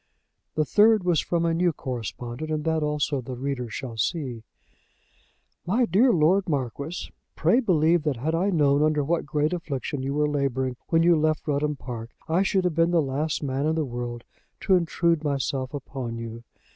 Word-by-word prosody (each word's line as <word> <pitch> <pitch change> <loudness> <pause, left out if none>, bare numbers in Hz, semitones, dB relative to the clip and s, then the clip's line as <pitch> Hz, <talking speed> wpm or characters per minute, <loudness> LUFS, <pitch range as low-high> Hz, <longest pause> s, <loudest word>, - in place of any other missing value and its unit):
The 155 - +2
third 215 +3 +4
was 175 -3 +2
from 170 -1 0
a 165 - +2
new 175 +1 +2
correspondent; 120 - -5
and 155 -1 -1
that 160 0 0
also 150 -2 0
the 125 +1 -6
reader 125 -2 -3
shall 115 0 -6
see; 125 -1 -2 1.3
"MY 235 +7 +3
DEAR 230 +7 +4
LORD 180 +1 +3
MARQUIS, 140 - -3 0.2
Pray 245 - +3
believe 170 - +3
that 145 -4 -1
had 150 +7 -2
I 180 +5 +1
known 145 -5 +3
under 150 -1 +2
what 165 +1 -1
great 150 +2 0
affliction 145 -5 -3
you 135 +1 -2
were 150 0 +2
labouring 135 -3 -1
when 165 0 +3
you 170 0 +5
left 155 0 0
Rudham 150 0 0
Park 120 -4 -7 0.2
I 165 +3 +2
should 195 -1 +1
have 180 -2 +1
been 165 +1 +3
the 175 -1 +3
last 150 +2 -1
man 135 +1 -1
in 160 - +1
the 160 -2 0
world 120 -1 -5 0.4
to 190 - +4
intrude 170 -2 +1
myself 135 -2 -1
upon 130 -4 -5
you. 115 0 -7
150 Hz, 185 wpm, -25 LUFS, 130-165 Hz, 1.3 s, you